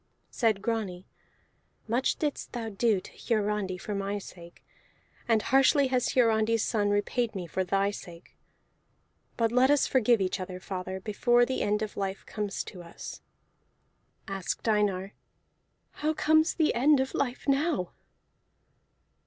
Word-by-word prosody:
Said 220 -4 +1
Grani, 200 -6 -2 0.8
"Much 240 +4 +1
didst 295 -2 -3
thou 230 -2 -3
do 215 0 +1
to - - -13
Hiarandi 210 -4 -1
for 205 +3 -5
my 200 +1 -2
sake, 175 -3 -12 0.6
and 225 -2 +3
harshly 270 +1 +4
has 255 -1 +1
Hiarandi's 225 -2 +3
son 205 -3 +1
repaid 215 +3 0
me 185 -2 -4
for 185 +3 -2
thy 195 +2 +1
sake. 175 -3 -11 1.0
But 230 -1 +2
let 250 +2 +4
us 290 -1 +4
forgive 245 -3 +3
each 190 0 -1
other, 185 0 -6
father, 185 0 -5
before 240 +4 +3
the 260 +1 -2
end 210 +1 +1
of 215 - -6
life 195 -1 -3
comes 210 -2 -3
to 180 - -10
us." 170 -1 -9 1.1
Asked 195 +2 -4
Einar: 205 -3 +1 0.8
"How 310 +1 -2
comes 315 +1 +3
the 315 -2 +2
end 280 +4 +4
of 265 0 -1
life 255 0 -2
now?" 275 - +1
215 Hz, 140 wpm, -28 LUFS, 195-245 Hz, 1.1 s, harshly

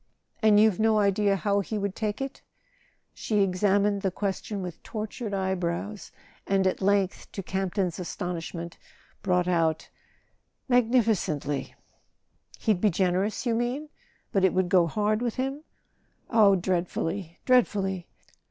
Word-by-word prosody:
"And 215 -2 +6
you've 215 -3 +4
no 220 0 +3
idea 200 0 +3
how 200 +1 +1
he 210 +2 -3
would 200 -1 -2
take 215 +2 -2
it?" 270 0 -5 0.7
She 210 -2 0
examined 200 +2 +2
the 195 - +1
question 195 +1 -3
with 180 -2 -7
tortured 215 0 -5
eye 190 -1 0
brows, 185 +3 -4 0.4
and 195 -1 +2
at 185 - 0
length, 200 -1 +1
to 195 - -5
Campton's 190 -1 -2
astonishment, 170 -1 -5 0.4
brought 180 -2 +1
out: 165 -3 0 0.3
' - - -42
' - - -49
Magnificently 220 - +1 0.8
"He'd 210 -6 +1
be 215 - +4
generous, 190 +5 0
you 235 - +1
mean? 245 +6 -2 0.4
But 195 - +1
it 190 - +3
would 185 -1 +1
go 180 -2 +4
hard 210 +5 0
with 240 -2 -1
him 270 +3 -2 0.4
?" - - -41 0.3
"Oh, 210 -4 +6
dreadfully, 175 -1 -2
dreadfully!" 195 -8 +2
195 Hz, 145 wpm, -27 LUFS, 180-215 Hz, 0.8 s, And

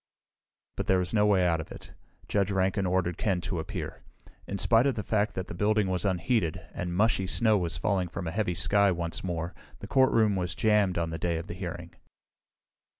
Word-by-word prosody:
But - - -3
there 95 - +4
was 90 +2 -1
no 105 -1 +4
way 95 -3 +3
out 85 -2 +1
of 80 - -11
it. - - -11 0.4
Judge 100 -1 +1
Rankin 95 0 +1
ordered 90 -2 0
Ken 95 -4 +1
to 90 -1 -3
appear. 80 - -6 0.5
In 100 - -3
spite 115 +5 +4
of 135 - 0
the 105 - -3
fact 105 +1 0
that 95 - -3
the - - -8
building 105 +2 +1
was 90 0 -1
unheated, 95 -1 0
and 85 0 -4
mushy 105 -2 +2
snow 110 +2 +2
was 85 -4 -1
falling 95 0 0
from 85 - -6
a 80 - -3
heavy 100 -2 -1
sky 100 +3 +3
once 85 -1 -2
more, 85 -2 -3 0.2
the - - -9
courtroom 115 -6 +3
was 90 -2 -2
jammed 105 -4 +2
on 85 -1 -1
the 80 - -4
day 85 0 0
of 80 - -5
the - - -7
hearing. 85 -2 -6
95 Hz, 210 wpm, -28 LUFS, 85-105 Hz, 0.5 s, there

